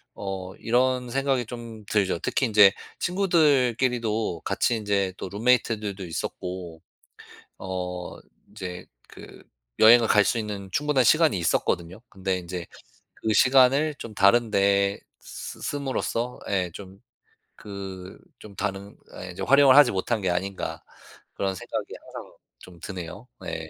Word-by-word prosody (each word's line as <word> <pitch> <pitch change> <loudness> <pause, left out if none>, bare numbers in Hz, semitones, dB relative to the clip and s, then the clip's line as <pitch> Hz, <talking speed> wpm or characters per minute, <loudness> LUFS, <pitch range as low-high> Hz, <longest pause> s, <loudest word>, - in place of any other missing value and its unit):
어 95 -1 -6
이런 125 +1 +1
생각이 135 -2 0
좀 115 -3 -9
들죠. 100 -4 0
특히 130 +7 0
인제 105 -3 +6 0.3
친구들끼리도 125 - +1
같이 120 - +1
인제 100 -3 -1
또 - - -6
룸메이트들도 105 -2 0
있었고 85 0 -6 0.8
어 90 -1 -5 0.3
인제 90 -1 -7 0.2
그 - - -13 0.4
여행을 115 +1 +7
갈 105 -1 +5
수 120 - +1
있는 100 -3 -5
충분한 150 +2 +2
시간이 155 - +4
있었거든요. 85 +3 -1
근데 95 -2 -2
인제 90 -1 -6 0.6
그 110 - +2
시간을 135 +6 +4
좀 115 - -8
다른 110 +4 +4
데 100 0 +2 0.2
쓰 - - -8
씀으로써 130 -3 -3
예 95 -3 0
좀 95 -1 -11 0.6
그 95 -2 -9 0.2
좀 100 -2 -13
다른 100 0 -4 0.2
아 - - -9
이제 90 +1 -9
'활용을 135 +4 +6
하지 145 -4 +7
못한 105 +4 -1
게 95 -2 0
아닌가.' 95 +2 -3 0.5
그런 95 -1 -2
생각이 - - -5
항상 - - -10 0.3
좀 85 +3 -15
드네요. 95 +5 -8
네. 80 -3 -6
100 Hz, 265 characters per minute, -25 LUFS, 95-125 Hz, 0.8 s, 여행을